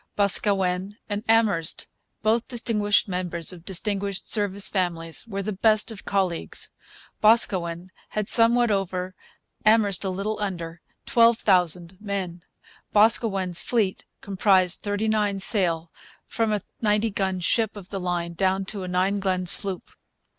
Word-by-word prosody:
Boscawen 195 -1 +2
and 205 +1 -3
Amherst, 210 -8 +2 0.4
both 225 +2 +1
distinguished 215 -5 +1
members 180 -2 -3
of 170 -2 -13
distinguished 200 +1 -2
Service 205 -2 +3
families, 170 0 -2
were 200 -2 -4
the 215 - -3
best 215 +3 +2
of 215 - -10
colleagues. 190 -4 -2 0.5
Boscawen 185 -5 +2 0.2
had 210 -1 -3
somewhat 235 0 +3
over, 185 -2 -2 0.5
Amherst 215 -3 +3
a 190 - -2
little 200 +4 -3
under, 170 -5 -5 0.2
12,000 185 -6 +2
men. 190 -4 -4 0.5
Boscawen's 205 -4 +2
fleet 215 -6 -1 0.2
comprised 190 -2 +2
39 210 0 -1
sail, 175 -5 0 0.3
from 225 -2 -1
a 210 -1 -1 0.2
90 210 0 +1
gun 190 -2 -2
ship 215 +4 0
of 190 -2 -11
the 195 - -5
line 175 -1 -3
down 190 +2 0
to 195 -1 -4
a - - -5
12 185 +3 0
gun 185 -2 -1
sloop. 190 +1 +2
195 Hz, 130 wpm, -24 LUFS, 180-215 Hz, 0.5 s, Service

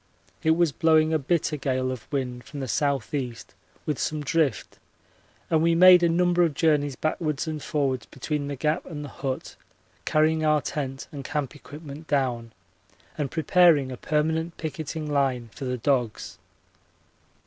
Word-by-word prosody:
It 160 +1 +3
was 170 -3 +3
blowing 160 +1 +3
a 160 - +2
bitter 155 +1 0
gale 130 -2 -1
of 130 0 -8
wind 125 -3 -3
from 145 - -8
the - - -3
S.E. 135 -1 -1 0.5
with 150 -3 -2
some 155 -1 -2
drift 145 -4 0 0.7
and 160 -1 +2
we 165 0 +3
made 180 +1 +8
a 170 - +3
number 175 +1 +2
of 165 -4 +2
journeys 145 -4 +2
backwards 155 0 -1
and 155 -1 -4
forwards 140 -5 -1
between 145 +2 -3
the 140 - -3
Gap 155 +5 0
and 150 -3 -6
the - - -8
hut, 135 -1 -5 0.5
carrying 155 +1 +2
our 155 -1 +4
tent 135 -2 -4
and 140 -2 -7
camp 145 0 -3
equipment 150 +1 -10
down 125 -5 -1 0.6
and 145 -3 -2
preparing 160 -4 +4
a - - -4
permanent 160 +2 -1
picketing 160 0 -5
line 135 -6 0
for 135 - -7
the 125 0 -2
dogs. 120 -3 -1
150 Hz, 160 wpm, -25 LUFS, 135-160 Hz, 0.7 s, made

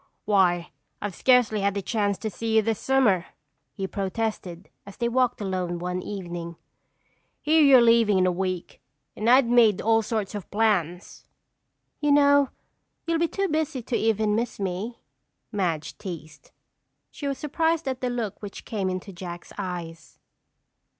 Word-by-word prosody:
"Why, 180 -4 +2 0.3
I've 205 -2 -4
scarcely 245 -2 +3
had 200 0 0
a - - -1
chance 205 -2 0
to 220 - -4
see 220 +4 -2
you 220 - +5
this 225 0 -1
summer," 230 -10 +2 0.4
he 190 +9 -4
protested 195 -2 -4 0.2
as 200 - -13
they 235 - 0
walked 250 0 +1
alone 185 -3 -2
one 180 +1 -3
evening. 175 -4 -6 0.8
"Here 315 +1 +3
you're 270 -4 +7
leaving 230 -3 +4
in 185 - +3
a 185 - +3
week 185 -1 -4 0.3
and 220 +2 0
I'd 255 +1 +6
made 230 -4 +5
all 225 0 +3
sorts 215 -2 -3
of 205 -3 -7
plans." 195 -5 -1 0.7
"You 295 -1 +1
know 285 -1 +5 0.6
you'll 330 -1 0
be 335 - +2
too 390 +3 -1
busy 310 -5 -2
to 240 - -2
even 215 -2 +1
miss 235 0 -2
me," 195 +5 -4 0.5
Madge 170 -8 -2
teased. 165 -5 -9 0.6
She 285 - -6
was 275 -1 -2
surprised 320 +1 0
at 260 -1 -3
the 250 - 0
look 235 -5 -4
which 205 -2 -8
came 200 -4 -2
into 185 +2 -5
Jack's 175 -1 -8
eyes. 170 -4 -6
210 Hz, 155 wpm, -25 LUFS, 185-245 Hz, 0.8 s, you're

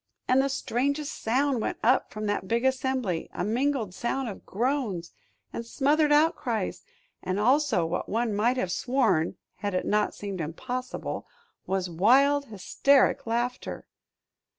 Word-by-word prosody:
And 255 +1 +4
the 275 - 0
strangest 280 +3 -2
sound 260 +2 +1
went - - -2
up 250 +4 +3
from 215 0 -5
that 205 -2 -1
big 235 +4 0
assembly, 260 -9 0
a - - -1
mingled 235 -1 0
sound 245 +4 -2
of 200 - -10
groans 225 -6 -1 0.4
and 235 - -4
smothered 295 +5 +2
outcries, 295 - +1 0.4
and 185 +2 -2
also 255 - +3
what 170 +2 -3
one 225 0 0
might 235 +5 +2
have 185 -7 -1
sworn 245 -9 +1 0.2
had 205 -2 -3
it 180 - 0
not 210 0 +1
seemed 200 -3 -5
impossible 250 - -5 0.4
was 190 0 0
wild 265 - +4
hysteric 245 +7 +2
laughter. 240 +2 -2
240 Hz, 140 wpm, -27 LUFS, 205-270 Hz, 0.4 s, And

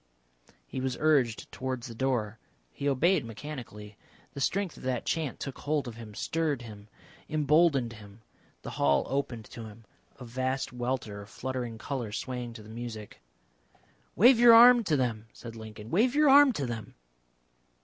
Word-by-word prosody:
He 130 - -5
was 130 -1 -2
urged 140 -8 +1
towards 130 -2 -4
the 120 - -8
door. 115 -4 -1 0.3
He 140 - -2
obeyed 160 +4 +2
mechanically. 110 -3 -9 0.4
The 140 - -6
strength 195 +4 -1
of - - -13
that 125 -2 -2
chant 155 -5 -2
took 135 - -6
hold 145 -2 -1
of 120 - -7
him, 110 -3 -10
stirred 155 -4 -1
him, 105 -2 -11 0.4
emboldened 150 -4 +2
him. 105 0 -14 0.4
The - - -6
hall 70 0 +2
opened 130 -5 -3
to 115 - -8
him, 110 +1 -13 0.3
a 125 - -10
vast 130 +2 -2
welter 120 -4 -3
of 100 - -12
fluttering 125 -3 -5
colour 120 -2 -4
swaying 125 +1 -5
to 110 -2 -11
the - - -14
music. 110 -2 -8 0.9
"Wave 240 +5 +6
your 235 -1 +9
arm 240 +1 +8
to 155 -5 +2
them," 115 -4 -2
said 115 -1 -10
Lincoln. 110 0 -10
"Wave 240 +8 +2
your 300 -2 +5
arm 285 0 +8
to 145 -9 -2
them." 115 -3 -6
125 Hz, 165 wpm, -29 LUFS, 110-150 Hz, 0.9 s, your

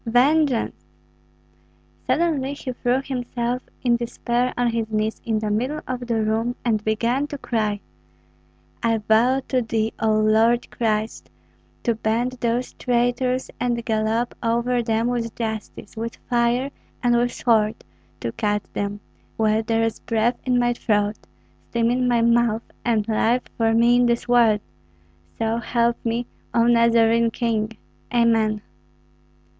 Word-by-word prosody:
Vengeance!" 255 - +2 1.2
Suddenly 290 -5 +1
he 260 -3 -5
threw 245 +2 0
himself 245 -2 -3 0.2
in 240 -2 +3
despair 240 +1 -1
on 245 -1 +2
his 225 -1 -2
knees 215 0 -1
in 225 -2 0
the 215 -1 -2
middle 255 +8 -1
of 250 -1 -4
the 225 -2 +1
room, 225 +3 0
and 215 -3 +1
began 235 +6 0
to 290 - -6
cry, 215 -5 -1 1.0
"I 230 -1 +2
vow 225 +5 +3
to 255 -1 +2
thee, 225 -1 -1
O 220 -1 +3
Lord 220 +3 +3
Christ, 220 -1 -2 0.5
to 235 - +2
bend 225 +3 0
those 240 +1 -1
traitors 250 +1 0
and 235 -1 -1
gallop 220 +1 0
over 235 +1 +1
them 225 0 0
with 235 -2 -2
justice, 220 -2 -5
with 230 +1 -4
fire, 245 +2 +1 0.3
and 240 -1 +3
with 240 +1 +2
sword, 220 -3 +2 0.5
to - - -2
cut 210 -2 -1
them, 205 0 -3 0.4
while 220 0 +2
there 225 0 0
is 225 -1 -1
breath 230 +1 0
in 250 -1 +3
my 240 0 +2
throat, 210 -3 0 0.5
steam 235 0 +1
in 250 0 +1
my 240 -1 +3
mouth, 235 -1 +3 0.2
and 220 -3 +1
life 230 +3 +2
for 225 -1 +2
me 235 +1 +5
in 245 0 +4
this 235 +1 0
world! 230 -4 +4 0.8
So 225 0 0
help 235 0 0
me, 235 +1 -1 0.3
O 230 - +5
Nazarene 230 -1 +4
King! 225 -2 -2 0.3
Amen!" 225 -3 +2
235 Hz, 140 wpm, -23 LUFS, 220-245 Hz, 1.2 s, me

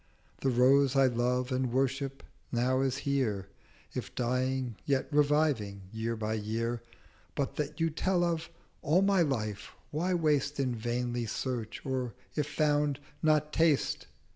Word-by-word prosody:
The 135 - +1
Rose 135 +2 +4
I 135 0 +6
love 125 +1 +1
and 130 -1 0
worship 135 +1 -1 0.3
now 130 +2 +2
is 135 -1 0
here; 110 -9 0 0.4
If - - -5
dying, 125 0 0
yet 135 -2 +1
reviving, 145 -9 +2
Year 115 +1 -2
by 110 0 -2
Year; 115 +2 -2 0.5
But 140 - -1
that 150 +2 -3
you 165 0 +2
tell 180 +3 +1
of, 165 -2 -1 0.3
all 170 +7 +3
my 195 -2 +4
Life 110 -9 -2 0.2
why 175 +5 0
waste 150 -3 +1
In 130 -3 +1
vainly 120 +1 -2
searching; 120 +2 -3
or, 125 -4 -2 0.2
if 150 - 0
found, 145 -1 +1 0.2
not 155 -1 +2
taste?' 160 -4 +2
130 Hz, 140 wpm, -31 LUFS, 120-150 Hz, 0.5 s, I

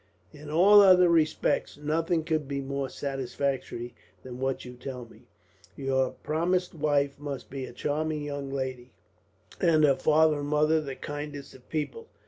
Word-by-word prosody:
"In 150 0 -11
all 195 +7 +7
other 180 -2 +7
respects, 160 -3 +1
nothing 160 +3 0
could 155 -3 -1
be 140 0 -3
more 140 0 -3
satisfactory 135 -3 -3 0.3
than 125 -1 -8
what 135 0 -2
you 125 - -8
tell 125 0 -7
me. 115 +1 -19 0.5
Your 130 -1 0
promised 175 +4 0
wife 145 -3 0
must 140 -4 -6
be 135 -1 -4
a - - -9
charming 155 +1 -2
young 145 -1 -5
lady, 130 -2 -5 0.7
and 160 -2 +4
her 145 -2 +6
father 155 +2 +3
and 145 - -4
mother 155 +1 +3
the 135 -3 -6
kindest 145 -1 -7
of 130 -1 -18
people. 160 - -4
145 Hz, 155 wpm, -28 LUFS, 135-155 Hz, 0.7 s, all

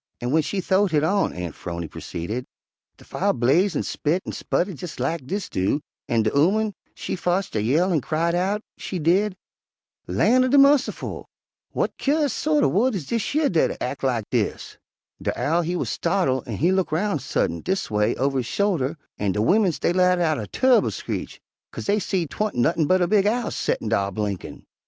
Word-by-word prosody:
"An' 120 - -3
w'en 160 +4 +3
she 190 +5 -2
th'owed 190 +2 +2
hit 150 -1 +3
on," 195 +5 +2
Aunt 90 -2 -5
'Phrony 85 -1 -5
proceeded, 105 +12 -5 0.5
"de - - -17
fire - - 0
blaze 155 - +2
an' - - 0
spit 165 +5 -1
an' - - -4
sputter 190 +3 -1
jes' 170 -2 -8
lak 135 +1 -2
dis 200 +4 -3
do, 95 +10 0 0.3
an' 115 -2 +2
de 110 - +1
ooman 205 +8 +2 0.2
she - - -4
fotched 180 -1 -1
a 105 - +1
yell 160 - +2
an' 155 - +2
cried 165 +5 0
out, 195 +4 0 0.2
she 190 - -4
did, 185 +5 +2 0.7
'Lan' 255 +2 +3
er - - +2
de 275 +3 +4
mussiful! 275 0 +3 0.5
W'at - - 0
cur'ous 290 0 +1
sort 300 -1 +1
er - - +5
wood 230 +4 +2
is 170 -7 -4
dish 230 - -2
yer 305 -1 +3
dat 165 - +1
ac' 125 +3 -4
lak 125 -4 0
dis?' - - -2 0.4
De - - -2
Owl 165 +4 +2
he 175 +2 -2
wuz - - -1
startle' 170 -8 0
an' 110 -4 -4
he 170 +5 +2
look 190 -1 0
roun' 165 0 0
suddint, 100 - -1
dis 190 - -2
a - - -6
way, 105 0 +2
over 135 +1 0
his 120 - -3
shoulder, 165 -7 0 0.2
an' 100 -2 0
de 105 - -2
wimmins 185 - +2
dey 170 - +1
let 180 0 +3
out 160 -3 +1
a 105 - -5
turr'ble 260 -1 +3
screech, - - -5 0.3
'kase - - -7
dey 205 +1 +2
seed 180 -6 -2
'twa'n't 215 0 -2
nuttin' 155 +5 +2
but 185 +2 +3
a - - +1
big 205 0 +3
owl 235 +1 0
settin' 110 - -2
dar 100 -3 +1
blinkin'. 100 -1 -4
170 Hz, 205 wpm, -23 LUFS, 130-200 Hz, 0.7 s, er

